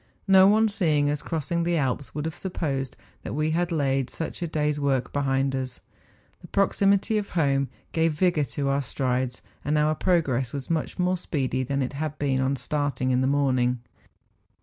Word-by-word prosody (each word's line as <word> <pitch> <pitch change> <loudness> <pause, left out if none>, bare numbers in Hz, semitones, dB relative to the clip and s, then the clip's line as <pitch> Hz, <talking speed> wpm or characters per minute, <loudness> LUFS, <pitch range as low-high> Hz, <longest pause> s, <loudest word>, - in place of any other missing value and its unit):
No 190 -1 +7
one 220 +2 +5
seeing 155 -8 +1
us 150 -1 -2
crossing 165 +1 -2
the 170 0 +1
Alps 135 -2 -2
would 150 0 -2
have 160 0 -3
supposed 140 -8 -3 0.2
that - - -5
we 155 +1 +1
had 175 +2 0
laid 135 -4 +1
such 165 - -5
a 170 - -1
day's 150 -2 0
work 135 -3 0
behind 135 -1 +1
us; 130 -1 -4 0.6
the - - -13
proximity 200 +2 +2
of 205 - -6
home 140 -3 +2 0.2
gave 165 -1 +2
vigour 160 -2 +2
to 140 +3 -3
our 140 +1 +1
strides, 130 0 -2 0.2
and 150 +1 +1
our 150 +1 +3
progress 140 -8 +1
was 140 +2 -4
much 160 -2 -1
more 180 0 +1
speedy 135 -7 -1
than 140 +1 -1
it 125 - -4
had 150 +1 -3
been 135 -2 0
on 135 +1 +1
starting 135 -1 -1
in 125 0 +2
the 130 - +2
morning. 130 -3 +2
145 Hz, 185 wpm, -26 LUFS, 135-165 Hz, 0.6 s, No